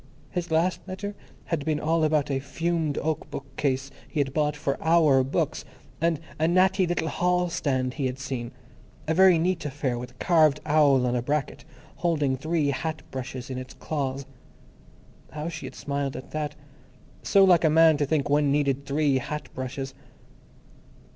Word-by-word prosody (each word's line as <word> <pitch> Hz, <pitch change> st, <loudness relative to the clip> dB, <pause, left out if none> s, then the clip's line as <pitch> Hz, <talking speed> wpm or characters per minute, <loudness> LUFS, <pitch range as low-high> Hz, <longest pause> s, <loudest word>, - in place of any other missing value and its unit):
His 175 Hz, -1 st, -3 dB
last 165 Hz, +3 st, +1 dB
letter 200 Hz, +2 st, -5 dB, 0.3 s
had 165 Hz, -4 st, -2 dB
been 155 Hz, 0 st, 0 dB
all 160 Hz, +2 st, +1 dB
about 150 Hz, -2 st, +2 dB
a 135 Hz, -, 0 dB
fumed 160 Hz, +2 st, -2 dB
oak 155 Hz, -1 st, -2 dB
bookcase 135 Hz, 0 st, -3 dB, 0.2 s
he 155 Hz, -, -4 dB
had 135 Hz, -2 st, 0 dB
bought 150 Hz, -1 st, +1 dB
for 140 Hz, -2 st, -1 dB
"our" 160 Hz, -5 st, +4 dB
books, 135 Hz, -, -1 dB, 0.4 s
and 165 Hz, -2 st, +2 dB, 0.2 s
a 160 Hz, -, +3 dB
"natty 185 Hz, +2 st, +3 dB
little 170 Hz, -2 st, -1 dB
hall 180 Hz, +1 st, +1 dB
stand" 130 Hz, -6 st, -1 dB
he 135 Hz, -2 st, -1 dB
had 125 Hz, 0 st, -4 dB
seen, 130 Hz, -3 st, -5 dB, 0.6 s
"a 160 Hz, -, +2 dB
very 185 Hz, 0 st, +6 dB
neat 170 Hz, 0 st, 0 dB
affair 135 Hz, -4 st, -2 dB
with 125 Hz, 0 st, -6 dB
a -, -, -20 dB
carved 155 Hz, 0 st, +3 dB
owl 145 Hz, -4 st, +4 dB
on 125 Hz, 0 st, 0 dB
a 120 Hz, -, +1 dB
bracket, 145 Hz, +2 st, -2 dB, 0.3 s
holding 150 Hz, -6 st, +1 dB
three 155 Hz, +1 st, 0 dB
hat 155 Hz, +4 st, -3 dB
brushes 130 Hz, 0 st, -6 dB
in 130 Hz, -, -3 dB
its 130 Hz, 0 st, -9 dB
claws." 140 Hz, -3 st, -3 dB, 1.1 s
How 155 Hz, +2 st, -4 dB
she 170 Hz, -, -6 dB
had -, -, -10 dB
smiled 140 Hz, -1 st, -3 dB
at 130 Hz, -, -8 dB
that! 150 Hz, -1 st, -3 dB, 0.7 s
So 200 Hz, -1 st, +4 dB
like 180 Hz, -3 st, +5 dB
a 160 Hz, -, +5 dB
man 160 Hz, 0 st, +6 dB
to 145 Hz, -, +1 dB
think 145 Hz, -2 st, +1 dB
one 145 Hz, 0 st, +3 dB
needed 140 Hz, -1 st, 0 dB
three 140 Hz, -1 st, +2 dB
hat 145 Hz, 0 st, -5 dB
brushes! 135 Hz, +1 st, -5 dB
150 Hz, 175 wpm, -26 LUFS, 135-165 Hz, 1.1 s, very